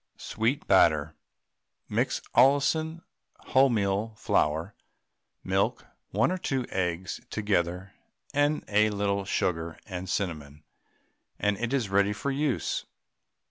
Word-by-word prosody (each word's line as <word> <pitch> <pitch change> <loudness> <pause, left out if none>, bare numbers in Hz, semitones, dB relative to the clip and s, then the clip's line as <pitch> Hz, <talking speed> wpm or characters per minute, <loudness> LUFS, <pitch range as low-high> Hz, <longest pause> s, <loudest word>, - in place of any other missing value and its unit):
SWEET 120 +7 -1
BATTER. 80 -6 +4 0.7
Mix - - -1
Allinson 150 +6 +3 0.5
wholemeal 110 -4 +2
flour, 80 +4 0 0.7
milk, - - 0 0.2
1 110 - +2
or 185 - -2
2 135 -7 -1
eggs 90 0 -2
together, 95 -2 -1 0.4
and 145 +1 +2
a 105 +1 +3
little 100 -1 -1
sugar 80 -3 -1
and 95 -1 -6
cinnamon, 75 -7 -3 0.7
and 105 0 +1
it 120 0 -2
is 130 -7 0
ready 100 +1 +3
for 140 +7 -3
use. 140 -1 -1
105 Hz, 105 wpm, -28 LUFS, 90-130 Hz, 0.7 s, BATTER